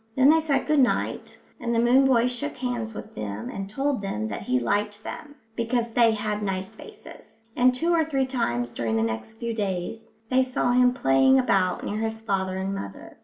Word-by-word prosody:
Then 270 +2 +6
they 320 - +5
said 280 -4 0
good 305 -1 +2
night, 255 - 0 0.2
and 235 -1 -1
the - - +3
moon 250 +3 +5
boy 245 -2 +4
shook 250 +4 -4
hands 240 -3 -3
with - - -8
them 105 0 -5
and 195 0 -6
told 270 +2 -1
them 110 - -3
that 100 - -5
he 125 0 0
liked 205 - -1
them, 295 -1 -8 0.2
because 235 0 -1
they 230 0 +4
had 210 -1 -2
nice 190 -1 -3
faces; 225 0 -14
and 250 +1 +5
two 330 +7 0
or 330 -1 +4
three 275 -4 0
times 120 - -1
during 115 -2 -2
the 110 - +2
next 110 - -3
few 235 0 -4
days 200 0 -4 0.2
they 260 +2 +3
saw 255 -1 0
him 250 0 +5
playing 135 - +4
about 195 -8 +1
near 210 - -3
his 220 0 -2
father 190 -4 -2
and 190 +1 -2
mother. 100 - -8
225 Hz, 205 wpm, -25 LUFS, 190-255 Hz, 0.2 s, Then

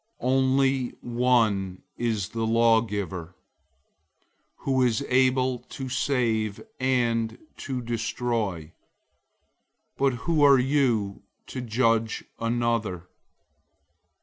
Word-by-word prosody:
004:012 125 - 0
Only 130 -1 +2
one 115 -6 +1
is 110 -6 -1
the 115 -1 -2
lawgiver, 105 -6 +1 1.3
who 130 -1 +1
is 125 +2 +1
able 130 0 +2
to 130 +2 -8
save 115 -6 0 0.2
and 120 -3 +1 0.2
to 130 -3 -4
destroy. 115 -7 -2 1.3
But 135 -1 +2
who 165 -3 +2
are 140 -2 +7
you 125 -7 +1 0.2
to 130 - -6
judge 115 -1 +1 0.2
another? 115 -6 -1
120 Hz, 90 wpm, -26 LUFS, 110-130 Hz, 1.3 s, are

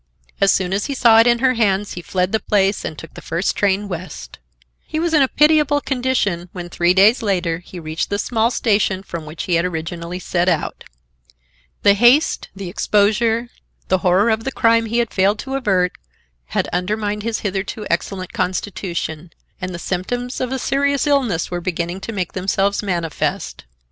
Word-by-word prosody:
As 195 - +5
soon 190 -1 0
as 200 +1 0
he 280 - -3
saw 230 -3 +6
it 230 - +6
in 240 0 +4
her 255 +1 +2
hands 205 -3 +1
he 175 - -6
fled 180 +1 -1
the 220 - +1
place 200 -1 +1
and 155 - -5
took 165 - -10
the - - -10
first 170 +3 -1
train 205 0 +1
west. 180 -1 -7 0.5
He 310 - -4
was 335 0 0
in 305 - +5
a 270 - +5
pitiable 300 0 +3
condition, 245 -11 -1
when, 175 -2 -6
three 175 +2 +2
days 210 +6 +5
later, 180 -6 0
he 180 0 -10
reached 160 0 -3
the 200 - -1
small 225 +2 +1
station 200 -5 +1
from 170 -5 -7
which 155 +2 -6
he 180 - -2
had 170 0 +3
originally 170 0 -4
set 180 0 0
out. 165 -4 -2 1.0
The 200 - +7
haste, 240 +9 +3
the 195 -1 -6
exposure, 220 +5 +1 0.4
the 185 - +3
horror 190 +5 +3
of 220 0 0
the 270 - -3
crime 230 -2 +3
he 235 +2 -1
had 235 -2 0
failed 200 +2 +2
to 270 - -6
avert, 190 -9 +1 0.5
had - - -1
undermined 210 +3 -1
his 225 +1 -2
hitherto 200 +1 -3
excellent 185 +2 -3
constitution, 180 -3 -3 0.3
and 185 0 -3
the 175 - -5
symptoms 245 +9 -3
of 255 -1 -2
a 265 - -1
serious 280 +2 +1
illness 255 - +1
were 175 0 -3
beginning 175 +1 -3
to 225 - -5
make 185 -5 -3
themselves 195 +2 0
manifest. 170 - -3
200 Hz, 185 wpm, -19 LUFS, 180-230 Hz, 1.0 s, The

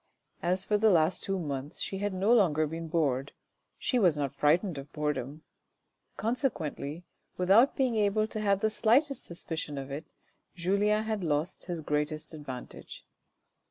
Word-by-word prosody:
As 185 +2 0
for 210 -1 +2
the 220 +1 +5
last 170 -2 +3
two 195 0 -1
months 145 -4 -4
she 195 - -3
had 205 0 -1
no 195 +5 +2
longer 160 -9 +4
been 165 +2 -5
bored, 140 -5 0 0.4
she 250 - 0
was 175 -8 +4
not 140 -2 -1
frightened 155 +3 +2
of 140 +2 -10
boredom; 150 -1 -3 0.7
consequently, 175 - -2 0.3
without 195 +9 +5
being 255 -4 +1
able 210 +1 +2
to 215 0 -5
have 200 -2 +2
the 220 - +2
slightest 265 +7 +2
suspicion 160 -3 -5
of 135 0 -6
it, 145 +4 -5 0.5
Julien 200 +4 +2
had 220 -3 -2
lost 155 +2 -1
his 175 -3 -4
greatest 150 +1 -2
advantage. 135 -5 -9
175 Hz, 155 wpm, -30 LUFS, 150-210 Hz, 0.7 s, the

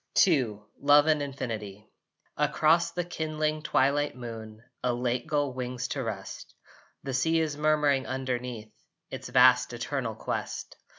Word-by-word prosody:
II 125 - +1 0.2
LOVE 145 +1 +6
AND 155 -2 +3
INFINITY 110 -7 -5 0.5
Across 165 +2 +2
the 175 - -1
kindling 155 -2 -2
twilight 145 -1 +1
moon 115 -2 -8 0.2
A 125 - +2
late 120 0 -1
gull 145 -4 0
wings 125 0 -4
to 140 - -2
rest. 105 -5 -6 0.5
The 135 - -4
sea 160 +6 +2
is 155 -2 -1
murmuring 150 -3 +2
underneath 125 -4 -4 0.4
Its - - -6
vast 125 -1 +5
eternal 120 -1 -3
quest. - - -4
130 Hz, 130 wpm, -28 LUFS, 120-150 Hz, 0.5 s, LOVE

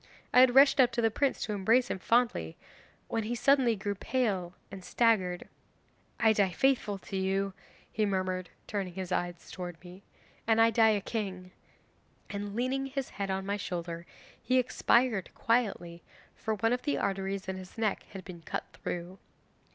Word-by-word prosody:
I - - +7
had 255 -1 +6
rushed 275 +1 +7
up 250 -2 +6
to 235 - 0
the 225 - +3
prince 275 +4 0
to 215 - -3
embrace 225 +6 +2
him - - -3
fondly, 230 - +1 0.5
when 225 - -1
he 225 +3 -3
suddenly 250 -1 +3
grew 205 0 -3
pale 195 -5 -1 0.2
and 195 -1 -8
staggered. 190 -6 +1 0.7
'"I 220 -1 +5
die 200 -3 +2
faithful 210 +1 +1
to 195 - -8
you," 195 +1 0 0.4
he 215 - 0
murmured, 185 -2 -2 0.2
turning 190 -4 -4
his 190 -1 -5
eyes 175 -1 -3
towards 175 -2 -6
me, 180 +2 -12 0.5
"and 225 0 +4
I 225 0 +6
die 225 -1 +5
a - - -4
king!" 190 -4 -4 0.8
and 205 0 -5
leaning 260 +3 -1
his 270 -1 -4
head 200 -1 -4
on 190 0 -2
my 200 +1 -1
shoulder 170 -3 -5 0.3
he 255 - +2
expired 245 -4 +2
quietly, 195 -8 0 0.3
for 220 -1 -2
one 225 +3 +1
of 250 - -1
the 290 - -1
arteries 195 0 -2
in 190 0 -3
his 185 +2 -11
neck 220 -2 0
had 190 -3 -9
been 175 -3 -9
cut - - -4
through. 175 +2 -6
200 Hz, 175 wpm, -30 LUFS, 185-235 Hz, 0.8 s, I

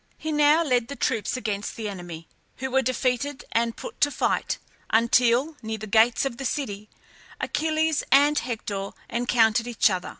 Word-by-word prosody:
He 315 - -4
now 300 +2 +4
led 250 -6 +1
the 280 - -6
troops 230 -3 -1
against 210 -4 -3
the 220 -2 -4
enemy, 175 -4 -8 0.3
who 265 0 -4
were 265 +1 +3
defeated 255 +2 -1
and 230 0 0
put - - -9
to 290 - +5
flight 275 - -1 0.3
until, 240 +6 +3
near 220 -1 -4
the 215 - -7
gates 225 +5 +3
of 235 -3 -3
the 270 - -6
city, 210 -7 -3 0.5
Achilles 315 0 0
and 290 +2 +5
Hector 205 -5 -4 0.2
encountered 235 -1 +2
each 230 -3 +3
other. 185 -1 -3
240 Hz, 165 wpm, -25 LUFS, 220-280 Hz, 0.5 s, to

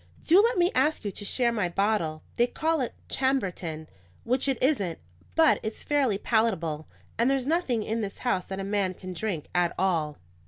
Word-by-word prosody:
"Do 355 +5 +7
let 465 0 +2
me 350 +1 +3
ask 285 -1 +1
you 205 - -1
to 205 - -6
share 240 +3 +1
my 205 -6 0
bottle. 175 -5 0
They 240 - +3
call 320 +2 0
it 245 - -3
Chambertin, 185 - -1 0.4
which 255 +3 +1
it 270 -2 +1
isn't; 205 - +1 0.4
but 320 -1 +5
it's 215 0 -5
fairly 275 -8 +2
palatable, 190 -10 0 0.3
and 235 +3 +4
there's 270 -2 +1
nothing 280 -8 +1
in 225 +2 -2
this 200 -2 -4
house 185 -7 +1
that 190 0 -5
a - - -3
man 195 -2 0
can 185 0 -7
drink 180 -4 -3
at 175 -1 +1
all." 165 -5 0
220 Hz, 190 wpm, -27 LUFS, 185-265 Hz, 0.4 s, Do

